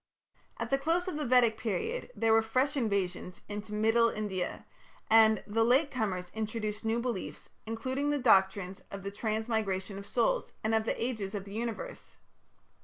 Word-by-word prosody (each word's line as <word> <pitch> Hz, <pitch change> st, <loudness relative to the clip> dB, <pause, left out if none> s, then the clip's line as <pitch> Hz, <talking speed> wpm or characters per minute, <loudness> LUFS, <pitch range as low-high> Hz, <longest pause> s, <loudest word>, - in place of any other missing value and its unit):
At -, -, -4 dB
the 275 Hz, -, +3 dB
close 330 Hz, +5 st, +1 dB
of 365 Hz, -, -3 dB
the 300 Hz, -, -2 dB
Vedic 240 Hz, -3 st, +4 dB
period 450 Hz, -, -2 dB
there 225 Hz, -1 st, +3 dB
were 225 Hz, -, +6 dB
fresh 260 Hz, +6 st, 0 dB
invasions 195 Hz, -7 st, -2 dB
into 210 Hz, +1 st, -6 dB
middle 225 Hz, +2 st, +3 dB
India, 200 Hz, -5 st, -3 dB, 0.5 s
and 220 Hz, -1 st, +6 dB
the 225 Hz, +2 st, +1 dB
"late 265 Hz, +6 st, +3 dB
comers" 190 Hz, -8 st, -2 dB
introduced 215 Hz, -1 st, -3 dB
new 225 Hz, +1 st, +1 dB
beliefs, 235 Hz, -5 st, -4 dB, 0.2 s
including 260 Hz, +6 st, -2 dB
the 290 Hz, -, +2 dB
doctrines 195 Hz, -6 st, +3 dB
of 195 Hz, -1 st, -7 dB
the 200 Hz, -, -4 dB
Transmigration 215 Hz, -3 st, -2 dB
of 200 Hz, -, -10 dB
Souls -, -, 0 dB
and 220 Hz, +1 st, +1 dB
of 220 Hz, 0 st, +2 dB
the -, -, -1 dB
Ages 220 Hz, -5 st, -2 dB
of 200 Hz, -1 st, -4 dB
the 200 Hz, -, -10 dB
Universe. 235 Hz, -, -5 dB
220 Hz, 170 wpm, -31 LUFS, 205-250 Hz, 0.5 s, were